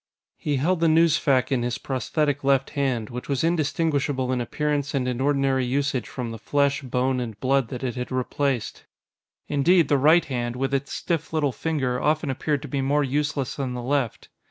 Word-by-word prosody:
He 145 - -1
held 170 +6 +1
the 165 - +3
newsfac 155 -5 +3
in 130 -3 +2
his 120 0 -1
prosthetic 145 +2 -1
left 135 0 +2
hand, 130 -6 -1
which 125 +3 -7
was 140 0 0
indistinguishable 145 -5 0
in 125 -1 0
appearance 145 +3 -1
and 130 -2 0
in 125 0 -2
ordinary 135 -2 +2
usage 135 0 -1
from 125 -3 -5
the 115 - -7
flesh, 140 +4 +1
bone, 130 0 0
and 115 -4 -5
blood 135 0 +2
that 125 +1 -6
it 125 -2 -1
had 125 0 -5
replaced. 130 0 -2 0.6
Indeed, 160 +2 +3
the 145 - +3
right 155 +5 +5
hand, 120 -3 -3
with 135 +2 -2
its 135 +1 -1
stiff 165 -2 -2
little 150 -3 +1
finger, 130 -4 -1
often 150 -1 +1
appeared 145 +2 -1
to - - -6
be 140 0 -2
more 145 +2 +2
useless 145 -1 -1
than 130 -3 -3
the 120 - -5
left. 130 -3 -1
135 Hz, 190 wpm, -24 LUFS, 125-145 Hz, 0.6 s, right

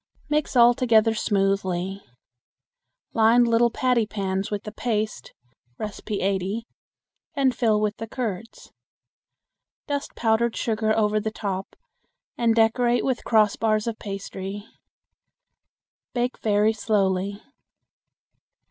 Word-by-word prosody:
Mix 300 -2 0
all 240 0 +7
together 225 -2 +3
smoothly. 195 -2 -1 1.1
Line 230 +2 +5
little 235 0 +3
patty 240 -2 +1
pans 195 -2 -2
with 205 -1 -3
the 210 - -7
paste 215 -1 -3 0.5
(No. 215 -1 -3 0.2
80), 200 +2 -1 0.7
and 270 -3 +2
fill 220 -4 +2
with 210 0 -1
the 225 - -6
curds. 225 -3 -5 1.1
Dust 285 -1 -4
powdered 225 0 +1
sugar 220 -1 0
over 215 -1 +2
the 220 +1 -2
top 195 -3 -5 0.6
and 230 -2 +2
decorate 240 +2 +2
with 260 -2 -1
crossbars 215 -1 +2
of 230 -1 -4
pastry. 195 0 -6 1.5
Bake 245 +1 -1
very 210 0 +2
slowly. 200 -2 0
220 Hz, 105 wpm, -24 LUFS, 200-235 Hz, 1.5 s, all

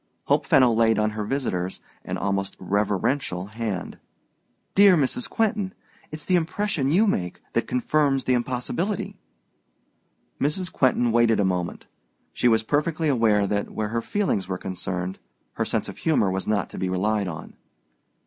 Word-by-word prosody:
Hope - - +1
Fenno 125 -3 +5
laid 115 -1 +3
on 110 0 +1
her 105 0 -3
visitor's 105 -7 -2 0.2
an - - -4
almost 100 -1 -2
reverential 100 +1 0
hand. 105 -3 -5 0.7
"Dear 195 -2 +7
Mrs. 155 - 0
Quentin, 215 -4 0 0.4
it's 155 0 -6
the 185 - +3
impression 165 -4 -1
you 190 +9 +4
make 90 - -1
that - - 0
confirms 135 +1 +1
the 130 - +1
impossibility." 130 - -2 1.2
Mrs. 170 +6 -1
Quentin 125 -2 +2
waited 115 -1 +3
a 100 - +3
moment: 90 -2 -2 0.5
she 125 - +1
was 110 -2 +3
perfectly 150 +5 0
aware 110 -6 +3
that, 100 +1 -1
where 105 -1 -3
her 115 +1 -1
feelings 150 - -1
were 95 -1 -2
concerned, 90 0 -4 0.3
her - - -1
sense - - -1
of - - -9
humor 140 - +2
was 95 0 -3
not 105 -2 0
to - - -7
be 95 - -1
relied 100 +2 0
on. 85 -2 -7
115 Hz, 155 wpm, -24 LUFS, 100-150 Hz, 1.2 s, Dear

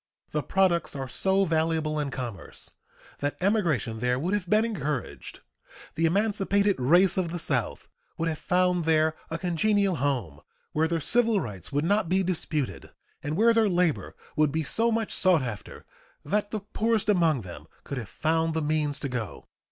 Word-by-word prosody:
The 150 - -1
products 180 -1 +1
are 135 -1 -4
so 190 +7 +2
valuable 160 -2 0
in 145 -2 -2
commerce 120 -8 -7 0.5
that 145 0 -2
emigration 170 - 0
there 125 +1 0
would 175 +9 -2
have 195 -4 -2
been 215 +3 +3
encouraged; 150 - -4 0.5
the 165 +1 +1
emancipated 200 0 +2
race 175 +9 +4
of 175 -3 -1
the 175 - -4
South 135 -9 -2 0.3
would 165 - -1
have 155 -2 -3
found 180 -2 +1
there 160 -1 +2
a 165 - -3
congenial 190 +2 +1
home, 120 - -2 0.3
where 160 +1 +1
their 165 0 -1
civil 230 +4 +4
rights 100 - -6
would 145 +2 0
not 200 -1 +1
be 190 +1 +2
disputed 160 -6 -2 0.3
and 150 +2 -3
where 230 +2 +5
their 225 -2 +3
labor 175 -4 0 0.2
would 150 -2 +2
be 160 +2 -1
so 230 +9 +4
much 225 -1 -1
sought 180 -7 +3
after 115 -5 -7 0.4
that 205 +7 0
the 215 -1 -4
poorest 215 +1 -1
among 165 - +2
them 90 -3 -10 0.2
could 140 - -5
have 110 - -8
found 160 0 0
the 160 - 0
means 150 -1 0
to - - -2
go. 125 -5 -6
165 Hz, 175 wpm, -26 LUFS, 145-195 Hz, 0.5 s, where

